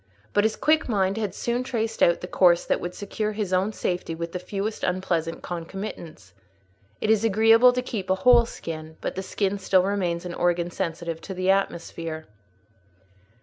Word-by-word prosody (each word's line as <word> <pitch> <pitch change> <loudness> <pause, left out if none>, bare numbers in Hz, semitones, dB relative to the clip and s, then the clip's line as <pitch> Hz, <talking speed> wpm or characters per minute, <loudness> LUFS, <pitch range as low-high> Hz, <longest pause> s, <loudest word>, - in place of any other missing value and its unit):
But 205 - +3
his 220 - +1
quick 310 -2 +2
mind 195 -2 +1
had 205 -4 -2
soon 240 +1 -1
traced 225 -3 -3
out 170 - +4
the 180 - -5
course 175 -2 +4
that - - 0
would 175 +1 -5
secure 210 +1 -3
his 205 -3 -3
own 190 +3 +2
safety 175 -5 -3
with 170 +1 -5
the 180 - -4
fewest 200 +4 -4
unpleasant 175 -3 -1
concomitants. 175 -1 -7 0.7
It 215 - +1
is 220 -1 +3
agreeable 225 +3 +6
to 250 0 -2
keep 200 -6 -5
a 190 - +4
whole 240 -2 +7
skin; 160 -5 -7
but - - -3
the 190 - -4
skin 200 +1 -1
still 190 -1 +3
remains 185 -3 -1
an 175 - -5
organ 175 0 0
sensitive 165 -1 -4
to 190 - -7
the 185 +1 +2
atmosphere. 165 -4 -2
190 Hz, 180 wpm, -25 LUFS, 170-215 Hz, 0.7 s, whole